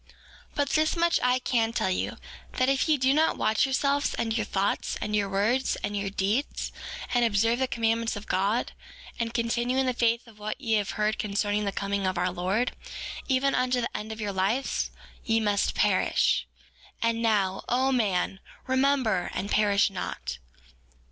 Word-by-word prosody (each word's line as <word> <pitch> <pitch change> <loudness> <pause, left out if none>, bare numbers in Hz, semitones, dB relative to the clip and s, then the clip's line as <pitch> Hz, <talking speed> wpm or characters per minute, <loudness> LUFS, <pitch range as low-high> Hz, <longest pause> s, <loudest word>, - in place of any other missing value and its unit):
4:30 - - -33 0.5
But 285 -1 +1
this 310 +2 +2
much 340 0 +3
I 250 0 +3
can 230 -3 0
tell 190 - 0
you, 185 - -2 0.4
that 255 - +1
if 275 +3 +2
ye 305 - +4
do 260 0 +3
not 315 +2 +2
watch 215 - +2
yourselves, 280 +1 +1
and 225 -1 -1
your 215 -3 -1
thoughts, 195 0 -1
and 210 - -2
your 200 -1 +1
words, 215 +7 +1
and 205 - -2
your 200 -1 -1
deeds, 205 +8 -1 0.4
and 245 -1 +3
observe 230 +2 +2
the 260 - +1
commandments 230 -1 0
of 205 +1 -7
God, 200 +6 0 0.5
and 230 -1 -1
continue 240 +2 0
in 265 - +3
the 255 - +1
faith 235 0 +1
of 215 -2 -17
what 215 +4 -4
ye 230 -5 -1
have 205 -2 -1
heard 215 0 0
concerning 205 0 0
the 200 - 0
coming 200 0 -1
of 185 -1 -1
our 180 +1 +1
Lord, 190 +7 0 0.6
even 275 0 +2
unto 250 0 +1
the 235 - -3
end 215 +1 -4
of 220 - -7
your 205 -2 -2
lives, 195 +8 0 0.3
ye 225 0 +2
must 205 -2 +1
perish. - - +2 0.6
And 230 0 +1
now, 205 -4 +1
O 260 +2 +2
man, 195 -6 0 0.3
remember, 260 -7 +2
and 200 - -3
perish 205 -1 +3
not. 65 - -5
225 Hz, 180 wpm, -27 LUFS, 200-255 Hz, 0.6 s, ye